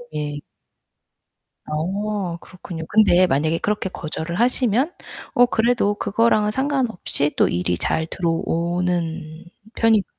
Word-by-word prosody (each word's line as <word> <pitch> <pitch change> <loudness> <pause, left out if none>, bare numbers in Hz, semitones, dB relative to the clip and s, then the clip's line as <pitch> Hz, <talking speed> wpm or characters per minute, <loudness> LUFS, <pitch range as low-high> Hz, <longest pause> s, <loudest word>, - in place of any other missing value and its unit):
예. 145 -1 -3 1.2
어, 190 +3 -2
그렇군요. 175 -3 -9
근데 195 -4 +5
만약에 160 +1 +1
그렇게 205 -1 -1
거절을 165 0 -5
하시면 250 - +2 0.4
어 245 0 +6
그래도 225 -3 +1
그거랑은 210 +1 +2
상관없이 255 - 0
또 - - +4
일이 90 0 -1
잘 160 - 0
들어오는 170 -1 -2 0.3
편인가요? 225 -3 +3
180 Hz, 260 characters per minute, -22 LUFS, 160-220 Hz, 1.2 s, 어